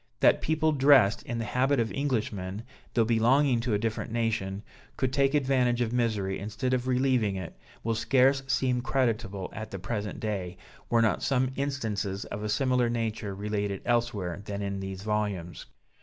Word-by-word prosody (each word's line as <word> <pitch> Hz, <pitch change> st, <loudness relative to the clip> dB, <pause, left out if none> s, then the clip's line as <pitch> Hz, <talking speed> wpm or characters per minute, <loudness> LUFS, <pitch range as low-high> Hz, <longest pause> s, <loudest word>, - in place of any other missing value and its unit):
That -, -, +5 dB
people 155 Hz, 0 st, +1 dB
dressed 135 Hz, -7 st, +5 dB
in 120 Hz, -, -2 dB
the 115 Hz, -, -2 dB
habit 130 Hz, +4 st, +1 dB
of 115 Hz, -1 st, 0 dB
Englishmen, 110 Hz, -7 st, -2 dB, 0.3 s
though 115 Hz, -2 st, +4 dB
belonging 120 Hz, +3 st, +3 dB
to 115 Hz, -2 st, 0 dB
a -, -, +3 dB
different 110 Hz, 0 st, -3 dB
nation, 110 Hz, -4 st, -1 dB, 0.3 s
could 130 Hz, -1 st, 0 dB
take 140 Hz, +1 st, +2 dB
advantage 130 Hz, -4 st, +2 dB
of 120 Hz, -1 st, 0 dB
misery 110 Hz, -6 st, 0 dB
instead 105 Hz, +5 st, -2 dB
of 130 Hz, 0 st, 0 dB
relieving 125 Hz, -5 st, +2 dB
it, 95 Hz, -3 st, -6 dB, 0.3 s
will 115 Hz, -, 0 dB
scarce 135 Hz, +4 st, +3 dB
seem 130 Hz, -2 st, +1 dB
creditable 110 Hz, -8 st, -1 dB
at 110 Hz, -1 st, -6 dB
the 95 Hz, -, -6 dB
present 105 Hz, +2 st, -4 dB
day, 95 Hz, -5 st, -3 dB, 0.3 s
were 115 Hz, -1 st, +4 dB
not 110 Hz, -, +1 dB
some 130 Hz, -1 st, +1 dB
instances 110 Hz, -8 st, -2 dB
of 100 Hz, -, -6 dB
a 105 Hz, -, -3 dB
similar 125 Hz, +1 st, +2 dB
nature 110 Hz, -3 st, -2 dB
related 100 Hz, -1 st, -3 dB
elsewhere 110 Hz, -7 st, 0 dB
than 100 Hz, -1 st, -4 dB
in 100 Hz, 0 st, -3 dB
these 95 Hz, 0 st, -6 dB
volumes. 105 Hz, -, -2 dB
115 Hz, 170 wpm, -28 LUFS, 100-130 Hz, 0.3 s, That